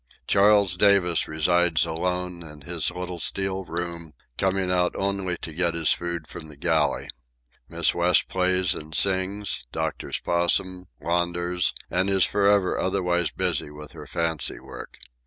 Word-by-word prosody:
Charles 100 -2 +4
Davis 100 -4 +3
resides 85 +1 +2
alone 90 +2 -3
in 75 -3 -11
his 70 - -2
little 90 -1 -6
steel 95 +2 -2
room, 85 -1 -5 0.2
coming 95 -1 0
out 90 -1 +1
only 95 -2 -1
to 80 - -5
get 85 0 0
his 80 -2 +2
food 85 -2 -2
from 80 - -9
the 75 - -12
galley. - - 0 0.6
Miss - - +2
West - - +3
plays 95 0 +1
and 80 -2 -7
sings, 95 -7 0
doctors 80 0 -3
Possum, 90 +1 0
launders, 85 +2 0 0.2
and 95 +2 +1
is 95 -2 +5
forever 100 -2 +2
otherwise 90 -3 +1
busy - - -1
with 75 0 -11
her - - -11
fancy 85 -2 -1
work. - - -11
90 Hz, 140 wpm, -25 LUFS, 85-95 Hz, 0.6 s, is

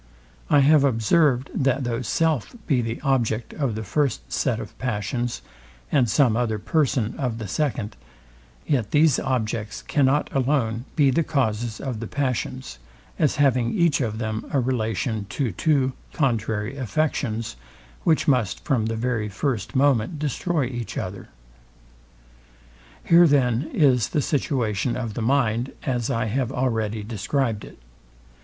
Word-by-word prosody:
I 145 - +5
have 145 +1 +5
observed, 130 +2 +2
that 135 0 +1
though 120 0 -2
self 155 - 0
be 135 -6 +2
the 115 0 -3
object 120 -5 0
of 135 -7 -1
the 110 - -4
first 110 - -1
set - - 0
of - - -8
passions, 120 0 -2 0.5
and 125 -4 +3
some 120 0 +3
other 115 -2 0
person 120 -1 0
of 125 -5 -1
the 110 -2 -5
second, 120 -2 -2 0.7
yet 125 -8 0
these 150 -2 +4
objects 110 -4 -2
cannot 145 0 +2
alone 125 -4 0
be 140 -4 +4
the 150 - +2
causes 120 -7 -1
of 125 -5 -4
the 115 - -5
passions; 130 - -3 0.4
as 150 -4 +2
having 130 -4 +2
each 170 -5 +3
of 110 -3 -2
them 110 -1 -3
a 140 - +2
relation 110 -4 -1
to 130 -2 -1
two 135 - +1 0.2
contrary 115 -3 -1
affections, 115 - -1 0.5
which 160 -2 +2
must 125 -9 +1
from 120 -6 +1
the 115 - -2
very 115 -2 -1
first 115 0 -2
moment 135 +1 +2
destroy 150 +1 -1
each 120 -4 -5
other. 95 +1 -5 1.7
Here 170 +1 +6
then 135 -1 +2
is 130 -6 +3
the 150 - +1
situation 125 -6 0
of 115 -4 -4
the 115 - -4
mind, 120 -1 +1
as 125 -3 -1
I 125 -3 0
have 125 +3 -1
already 110 -5 -1
described 110 +1 -1
it. - - -12
125 Hz, 145 wpm, -24 LUFS, 110-140 Hz, 1.7 s, Here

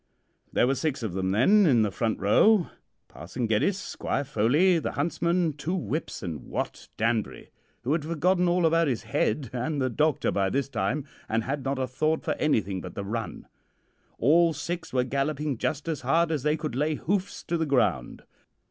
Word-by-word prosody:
"There - - +3
were 130 - +2
six 140 -3 -2
of 105 -6 -3
them 95 0 -1
then 180 - +5
in 120 -6 +4
the 105 - 0
front 110 +2 -1
row 175 - +4 0.4
Parson 95 - -5
Geddes, 115 - +1
Squire 200 - -3
Foley, 145 - +3
the - - -3
huntsman, 170 -1 0
two 155 +5 -3
whips, 145 - -3
and 85 -5 -5
Wat - - -4
Danbury, 115 -1 -1 0.3
who 125 - -1
had 155 -1 +1
forgotten 175 +3 +1
all 175 0 +2
about 165 0 +3
his 125 -5 -1
head 110 +2 -1
and 140 +4 -2
the 130 -1 0
doctor 150 +3 +1
by 95 -1 +1
this 140 +5 -1
time, 130 +7 -1 0.2
and 115 0 0
had 135 +3 -3
not 135 0 -1
a 130 - 0
thought 155 +5 -1
for - - 0
anything 100 -11 0
but - - -9
the 100 - -4
run. 110 +2 -4 0.7
All 165 +6 +4
six 170 +3 -5
were 125 -1 +2
galloping 140 0 -2
just 150 +1 -2
as 160 -3 -2
hard 165 +6 +2
as 155 -4 -1
they 150 +3 +1
could 120 - -4
lay 150 +4 0
hoofs 190 +5 -2
to 170 - -2
the 160 -2 0
ground. 100 - 0
140 Hz, 190 wpm, -27 LUFS, 115-160 Hz, 0.7 s, then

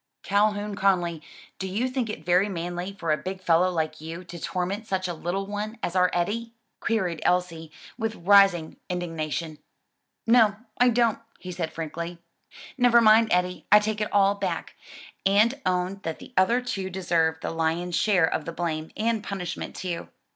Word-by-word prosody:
"Calhoun 205 +1 +1
Conly, 175 -5 +1 0.4
do 190 - -3
you 215 +7 -1
think 255 -3 -2
it 160 -7 -6
very 180 +4 +3
manly 175 +1 -4
for 170 -5 -3
a 155 - +3
big 185 +5 -5
fellow 175 0 +3
like 160 -3 -2
you 165 +3 -7
to 175 -1 -9
torment 190 +6 -3
such 185 -1 -1
a 175 - -3
little 175 +4 -3
one 210 +3 -4
as 175 - -2
our 180 0 +4
Eddie?" 225 +7 -2 0.3
queried 185 -8 -1
Elsie, 170 -3 0 0.3
with 225 -1 -2
rising 185 -3 +4
indignation. 165 -3 -3 0.7
"No, 225 -3 +5 0.2
I 245 0 +6
don't," 235 -2 +2 0.2
he 180 - -8
said 170 -2 -3
frankly. 170 +2 -5 0.6
"Never 245 -1 +6
mind, 220 0 +6
Eddie, 180 -1 0
I 210 - +10
take 210 0 0
it 210 - -2
all 200 0 +4
back, 200 -1 -3 0.5
and 215 +8 +3
own 180 +1 0
that 160 -4 -4
the - - -13
other 230 +7 +3
two 195 -6 -3
deserve 170 -3 +1
the - - -3
lion's 165 +2 -1
share 195 -6 +3
of 160 - -2
the 170 - -4
blame, 160 -2 -3
and 225 -1 0
punishment 190 -4 -5
too. 175 -3 -5
185 Hz, 170 wpm, -26 LUFS, 170-210 Hz, 0.7 s, I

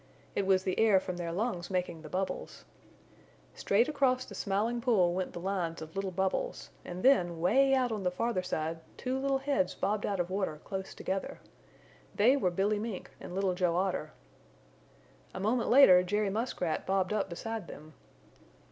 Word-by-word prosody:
It 195 - -1
was 190 -1 +3
the 185 - -1
air 215 -4 +5
from 185 -1 -5
their 170 -1 -3
lungs 180 -2 -2
making 180 -3 -2
the 155 - -10
bubbles. 190 +3 -4 0.9
Straight 215 +5 +2
across 260 -4 +1
the - - -11
Smiling 215 +4 -1
Pool 200 -8 +3
went 185 0 -3
the - - -6
lines 175 -3 -2
of 160 +2 -9
little 195 0 -2
bubbles 190 - -2
and 180 +1 -7
then 175 -11 +4
way 270 +10 +4
out 255 -2 +1
on 215 -2 -2
the 180 - +1
farther 185 +2 -1
side 160 -2 -3 0.2
two 260 +1 -2
little 275 0 +1
heads 270 -10 0
bobbed 205 +2 -1
out 200 -2 -1
of 175 +1 -1
water 190 -6 -2
close 190 0 -6
together. 190 0 -4 0.8
They 235 +6 +5
were 260 -10 +1
Billy 200 +4 0
Mink 215 -3 -5
and 180 - -8
Little 195 -1 +1
Joe 180 -2 +1
Otter. 180 -4 -1 1.2
A - - -4
moment 225 +4 0
later 235 -9 +8
Jerry 205 +2 0
Muskrat 200 -7 -2
bobbed 190 0 +1
up 205 -2 -1
beside 220 +3 -5
them. 155 +1 -11
195 Hz, 175 wpm, -31 LUFS, 180-225 Hz, 1.2 s, later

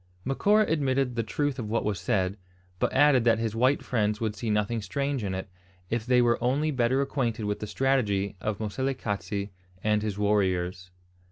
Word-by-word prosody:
Macora 205 - +3
admitted 135 -4 +1
the 115 - +1
truth 140 +4 -2
of 110 -3 -4
what 115 - 0
was 105 -4 -1
said, 95 -1 0 0.4
but - - +1
added 135 -3 +5
that 115 -1 +4
his 115 -1 -2
white 130 +5 +2
friends 105 -3 0
would 110 -2 -2
see 115 +2 -4
nothing 105 +2 0
strange 140 +5 -2
in 95 -2 -2
it, 95 - -5 0.4
if 115 0 -1
they 125 -1 +4
were 120 0 +2
only 145 +5 +1
better 130 0 +2
acquainted 120 -6 -1
with 105 0 -2
the 105 - -5
strategy 105 -7 0
of 105 0 -2
Moselekatse 105 -3 -3 0.3
and 105 0 +2
his 105 -2 -3
warriors. 95 -3 0
115 Hz, 180 wpm, -27 LUFS, 105-130 Hz, 0.4 s, added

